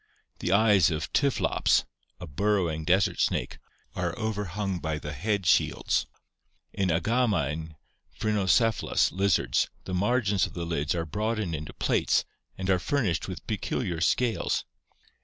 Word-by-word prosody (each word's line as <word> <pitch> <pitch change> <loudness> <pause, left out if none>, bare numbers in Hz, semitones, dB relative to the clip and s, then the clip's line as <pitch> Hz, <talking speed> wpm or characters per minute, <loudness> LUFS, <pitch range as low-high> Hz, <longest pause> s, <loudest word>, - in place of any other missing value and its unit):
The 90 - -1
eyes 100 -4 +5
of 75 -1 -4
Typklops 140 -2 +2 0.4
[a 90 - -6
bur 100 +8 0
rowing 80 -5 -1
desert 95 +4 +2
snake] - - 0 0.4
are 90 -2 -2
overhung 105 -4 -2
by 80 -1 -2
the 75 -1 -6
head 100 +6 -1
shields. 85 - +2 0.7
In 95 -2 0
Agama 95 - +1
and 80 0 -6 0.4
Phrynocephalus 110 +1 +2
[lizards] 90 -10 +1
the 95 - -6
margins 105 -1 +1
of - - -14
the 85 -1 -3
lids 80 -1 -1
are 85 -1 -2
broadened 105 +2 -2
into 75 -1 -5
plates - - +1 0.3
and 95 - -4
are 90 - +3
furnished 100 - 0
with - - -7
peculiar 85 -2 -2
scales. 115 +5 +1
95 Hz, 140 wpm, -27 LUFS, 80-105 Hz, 0.7 s, eyes